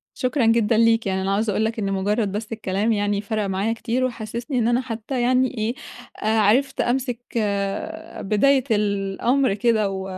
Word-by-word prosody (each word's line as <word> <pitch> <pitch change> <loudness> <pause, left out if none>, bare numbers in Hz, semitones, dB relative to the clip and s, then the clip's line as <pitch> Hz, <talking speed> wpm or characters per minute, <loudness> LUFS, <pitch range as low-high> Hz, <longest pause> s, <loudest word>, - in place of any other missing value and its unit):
شكرًا 255 -1 0
جدًا 225 -1 +3
ليك، 225 -1 +3
يعني 190 0 0
أنا 195 +1 -1
عاوزة 215 +1 +1
أقول 220 - +1
لك 225 0 -2
إنه 195 -1 -1
مجرد 200 +2 0
بس 210 +2 -5
الكلام 215 0 -1
يعني 205 -1 0
فرَق 215 0 -2
معايا 195 +4 0
كتير، 235 +2 -2
وحسسني 235 +2 -3
إن 230 - +1
أنا 240 +2 +2
حتى 240 +1 -4
يعني 255 0 +2
إيه 220 +3 -1 0.5
آآ 220 +1 +2
عرفت 250 +7 +2
أمسك 245 -1 -1 1.0
بداية 260 +7 +3
الأمر 205 +5 +1
كده، 215 0 +1
و 190 -1 -4
225 Hz, 170 wpm, -22 LUFS, 205-240 Hz, 1.0 s, جدًا